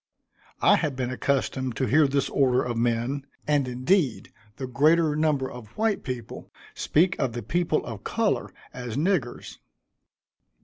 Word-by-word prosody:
I -, -, +6 dB
had 145 Hz, -3 st, -1 dB
been 130 Hz, -1 st, -2 dB
accustomed 130 Hz, -1 st, -1 dB
to 130 Hz, -, 0 dB
hear 150 Hz, +3 st, +4 dB
this 140 Hz, 0 st, 0 dB
order 130 Hz, -2 st, +2 dB
of 120 Hz, -1 st, -3 dB
men, 120 Hz, +4 st, -1 dB, 0.2 s
and 145 Hz, -3 st, +2 dB
indeed 130 Hz, -, 0 dB, 0.2 s
the 135 Hz, -, -5 dB
greater 150 Hz, +4 st, +3 dB
number 150 Hz, -4 st, +1 dB
of 120 Hz, -3 st, -10 dB
white 220 Hz, -2 st, +1 dB
people 125 Hz, -4 st, -7 dB, 0.2 s
speak 180 Hz, +4 st, +2 dB
of 120 Hz, -, 0 dB
the 120 Hz, -1 st, -5 dB
people 170 Hz, +5 st, 0 dB
of 110 Hz, -4 st, -7 dB
color -, -, 0 dB, 0.2 s
as 125 Hz, -2 st, -5 dB
niggers. 150 Hz, -, -1 dB
135 Hz, 145 wpm, -26 LUFS, 125-150 Hz, 0.2 s, I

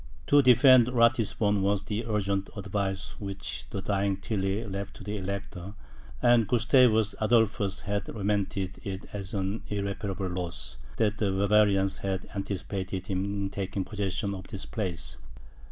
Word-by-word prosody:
To 145 Hz, -, +6 dB
defend 130 Hz, -1 st, +7 dB
Ratisbon, 115 Hz, -4 st, +2 dB
was 100 Hz, 0 st, +1 dB
the 110 Hz, +2 st, -3 dB
urgent 100 Hz, -2 st, 0 dB
advice 95 Hz, -1 st, -3 dB
which 100 Hz, -2 st, -5 dB
the 100 Hz, -, -5 dB
dying 100 Hz, 0 st, 0 dB
Tilly 95 Hz, +1 st, -2 dB
left 100 Hz, 0 st, -5 dB
to -, -, -10 dB
the 105 Hz, 0 st, -4 dB
Elector; 100 Hz, 0 st, -5 dB, 0.5 s
and 120 Hz, -3 st, +5 dB
Gustavus 120 Hz, -3 st, +4 dB
Adolphus 110 Hz, -3 st, +2 dB
had 100 Hz, -2 st, -2 dB
lamented 100 Hz, -2 st, -2 dB
it 95 Hz, -3 st, -5 dB
as 100 Hz, -1 st, -5 dB
an 100 Hz, +2 st, -1 dB
irreparable 100 Hz, -1 st, -3 dB
loss, 85 Hz, -10 st, -4 dB, 0.2 s
that 110 Hz, -1 st, +1 dB
the 105 Hz, -, +1 dB
Bavarians 100 Hz, -1 st, +3 dB
had 95 Hz, -1 st, -3 dB
anticipated 95 Hz, -1 st, -4 dB
him 95 Hz, -1 st, -1 dB
in 100 Hz, -1 st, -2 dB
taking 95 Hz, -1 st, -3 dB
possession 100 Hz, -1 st, -2 dB
of 95 Hz, -1 st, -8 dB
this 95 Hz, -, -6 dB
place. 90 Hz, -, -4 dB
100 Hz, 140 wpm, -28 LUFS, 95-105 Hz, 0.5 s, defend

